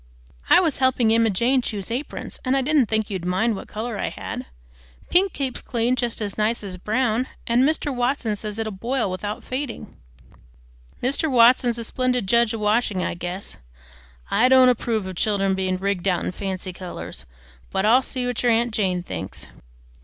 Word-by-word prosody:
"I -, -, +8 dB
was 320 Hz, -8 st, 0 dB
helping 255 Hz, -4 st, +3 dB
Emma 230 Hz, 0 st, +4 dB
Jane 240 Hz, +7 st, +2 dB
choose 205 Hz, -4 st, -4 dB
aprons, 255 Hz, +6 st, -5 dB
and 255 Hz, 0 st, +1 dB
didn't 295 Hz, -4 st, +3 dB
think 220 Hz, -1 st, -1 dB
you'd 190 Hz, -3 st, -3 dB
mind 190 Hz, +6 st, +1 dB
which -, -, -8 dB
color 220 Hz, 0 st, -4 dB
I -, -, -1 dB
had. -, -, -6 dB, 0.6 s
Pink 380 Hz, +2 st, +4 dB
keeps 270 Hz, -5 st, -3 dB
clean 240 Hz, +1 st, 0 dB
just 240 Hz, -2 st, -2 dB
as 205 Hz, 0 st, -5 dB
nice 215 Hz, +1 st, +1 dB
as 190 Hz, -2 st, -6 dB
brown, 235 Hz, +5 st, 0 dB, 0.2 s
and 235 Hz, +1 st, +3 dB
Mr. 290 Hz, 0 st, +1 dB
Watson 245 Hz, -3 st, 0 dB
says 210 Hz, 0 st, -5 dB
it'll 220 Hz, -1 st, -2 dB
boil 230 Hz, +1 st, -1 dB
without 205 Hz, +3 st, -4 dB
fading." 260 Hz, -1 st, -5 dB, 1.1 s
"Mr. 280 Hz, +5 st, +1 dB
Watson 245 Hz, 0 st, +5 dB
's -, -, -10 dB
a 230 Hz, -, -4 dB
splendid 250 Hz, -1 st, 0 dB
judge 235 Hz, +3 st, +3 dB
of 225 Hz, -, -3 dB
washing, 210 Hz, -3 st, +1 dB
I -, -, -2 dB
guess. 175 Hz, +3 st, -5 dB, 0.7 s
I 235 Hz, +5 st, +4 dB
don't 260 Hz, -1 st, +7 dB
approve 225 Hz, -4 st, 0 dB
of 185 Hz, -2 st, -6 dB
children 195 Hz, -2 st, +1 dB
being 185 Hz, -1 st, -1 dB
rigged 195 Hz, -1 st, -1 dB
out 180 Hz, -2 st, +1 dB
in -, -, -1 dB
fancy 185 Hz, 0 st, -4 dB
colors, 175 Hz, -, -8 dB, 0.4 s
but 190 Hz, +1 st, 0 dB
I'll 240 Hz, +4 st, +6 dB
see 255 Hz, -1 st, -3 dB
what 245 Hz, -2 st, -2 dB
your 245 Hz, -, +3 dB
aunt 230 Hz, 0 st, +1 dB
Jane 185 Hz, -4 st, 0 dB
thinks." -, -, -6 dB
225 Hz, 185 wpm, -23 LUFS, 195-250 Hz, 1.1 s, I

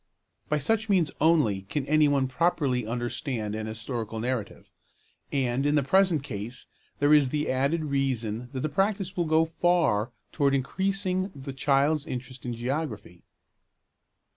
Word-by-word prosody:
By 150 Hz, -, +2 dB
such 220 Hz, +9 st, 0 dB
means 180 Hz, -7 st, +3 dB
only 150 Hz, -12 st, +3 dB
can 145 Hz, -3 st, -2 dB
any 155 Hz, +1 st, +4 dB
one 140 Hz, -2 st, +2 dB
properly 130 Hz, -5 st, 0 dB
understand 120 Hz, -1 st, -3 dB
an 110 Hz, 0 st, -4 dB
historical 110 Hz, 0 st, -5 dB
narrative; 120 Hz, -2 st, -3 dB, 0.6 s
and 130 Hz, -1 st, 0 dB
in 145 Hz, +1 st, +2 dB
the 145 Hz, -, +3 dB
present 180 Hz, 0 st, +3 dB
case 120 Hz, -1 st, -6 dB, 0.3 s
there 145 Hz, +1 st, +4 dB
is 145 Hz, -3 st, +5 dB
the 150 Hz, +1 st, -1 dB
added 140 Hz, +5 st, 0 dB
reason 125 Hz, -5 st, -1 dB
that 130 Hz, -, -4 dB
the 155 Hz, -, 0 dB
practice 195 Hz, +3 st, -1 dB
will 175 Hz, -, 0 dB
go 160 Hz, +1 st, +3 dB
far 160 Hz, -10 st, +1 dB, 0.2 s
towards 140 Hz, -2 st, +2 dB
increasing 190 Hz, +6 st, -1 dB
the 135 Hz, 0 st, -7 dB
child's 140 Hz, +2 st, +2 dB
interest 125 Hz, 0 st, -6 dB
in 120 Hz, -, -3 dB
geography. 120 Hz, -, -4 dB
140 Hz, 145 wpm, -27 LUFS, 120-160 Hz, 0.6 s, is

